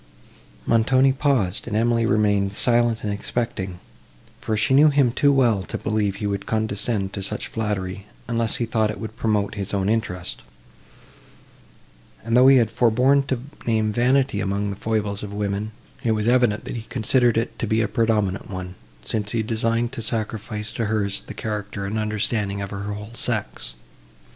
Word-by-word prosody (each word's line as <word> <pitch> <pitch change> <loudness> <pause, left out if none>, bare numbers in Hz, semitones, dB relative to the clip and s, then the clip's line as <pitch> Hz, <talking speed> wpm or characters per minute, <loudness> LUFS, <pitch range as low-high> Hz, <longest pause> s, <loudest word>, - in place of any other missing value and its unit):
Montoni 130 +4 +4
paused; 130 -10 0
and 105 -2 -1
Emily 115 0 +2
remained 100 -2 +2
silent 120 0 +1
and 105 -1 -1
expecting; 100 -3 -3 0.6
for 110 - -2
she 110 +5 +2
knew 150 +3 +7
him 140 -4 +3
too 140 +3 +3
well, 120 -7 +3
to - - -5
believe 105 -2 -1
he 105 - -5
would 100 -1 -2
condescend 110 -2 -1
to 100 - -4
such 95 - -2
flattery, 100 -3 -3 0.2
unless 115 -2 +1
he 120 - 0
thought 110 -1 +1
it 105 -2 -5
would 110 0 -6
promote 105 -3 0
his 100 -1 -4
own 95 0 0
interest; 100 -5 -2 1.8
and, 115 +1 0
though 125 +1 +7
he 135 0 +8
had 115 -3 +2
forborne 125 +4 +3
to 130 -3 -1 0.3
name 110 -2 +1
vanity 130 -1 +2
among 100 +1 -1
the - - -5
foibles 105 -1 -2
of 100 -1 -6
women, 105 +1 -2 0.3
it 115 -3 +2
was 105 0 -1
evident, 120 -4 +3
that - - -5
he - - -4
considered 120 0 +2
it 115 - -2
to 115 - -1
be 110 +2 +2
a - - 0
predominant 105 -3 0
one, 90 -2 -6 0.3
since 105 -2 -2
he 115 -1 +1
designed 115 +1 0
to 125 - -5
sacrifice 110 -1 -2
to 115 - -2
hers 105 -2 0
the - - -7
character 105 -2 -4
and 105 +3 -2
understanding 105 -1 -1
of 100 -1 -5
her 100 0 -5
whole 105 +2 -7
sex. - - -1
110 Hz, 175 wpm, -23 LUFS, 100-115 Hz, 1.8 s, he